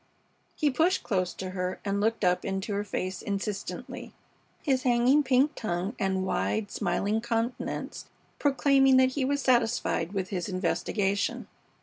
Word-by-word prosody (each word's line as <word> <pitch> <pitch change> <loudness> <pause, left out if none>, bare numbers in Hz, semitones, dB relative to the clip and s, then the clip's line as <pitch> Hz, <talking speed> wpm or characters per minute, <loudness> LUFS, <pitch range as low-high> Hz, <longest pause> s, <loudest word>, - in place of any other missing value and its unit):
He 295 -2 +1
pushed 330 +7 +2
close 185 -4 0
to 185 -1 -5
her 180 0 -3
and 200 0 0
looked 225 +1 0
up 180 0 +2
into 195 +2 -3
her 200 +1 -1
face 185 -2 -4
insistently, 200 0 -5 0.5
his 265 -3 +2
hanging 250 +3 +4
pink 265 +1 +3
tongue 185 +2 -3
and 190 -2 0
wide, 205 +2 -1
smiling 210 +3 0
countenance 235 +1 -3 0.3
proclaiming 270 -2 +4
that 260 0 +5
he 265 +1 -2
was 280 +1 0
satisfied 230 -7 +1
with 190 -2 -2
his 180 -1 -3
investigation. 195 +2 -1
215 Hz, 140 wpm, -28 LUFS, 190-260 Hz, 0.5 s, that